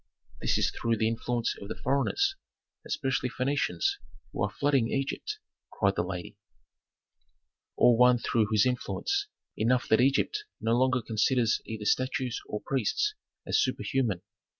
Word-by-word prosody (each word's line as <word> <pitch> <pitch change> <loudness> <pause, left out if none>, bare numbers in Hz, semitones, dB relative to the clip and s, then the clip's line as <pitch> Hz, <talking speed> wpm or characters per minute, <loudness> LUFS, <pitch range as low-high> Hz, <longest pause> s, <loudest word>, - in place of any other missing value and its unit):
"This - - +1
is - - +1
through 115 -1 -1
the 110 - +2
influence 115 +1 -1
of 100 - -8
foreigners, 265 - +1 0.5
especially 135 -2 -1
Phœnicians, 140 - 0 0.3
who - - -5
are - - +1
flooding 140 -5 +1
Egypt," 140 - -2 0.3
cried 100 -1 +1
the - - +1
lady. 90 0 -6 1.4
"All 120 - +6
one 125 +1 +6
through 115 -2 +1
whose 110 0 +3
influence; 395 - -1 0.3
enough 120 +3 +1
that 110 - +5
Egypt 140 - +1
no 115 +1 +1
longer 130 -1 +2
considers 115 +1 +1
either 110 -1 -5
statues 130 0 0
or 105 - -4
priests 135 - 0 0.3
as - - +2
superhuman. 115 -10 0
125 Hz, 135 wpm, -29 LUFS, 110-135 Hz, 1.4 s, All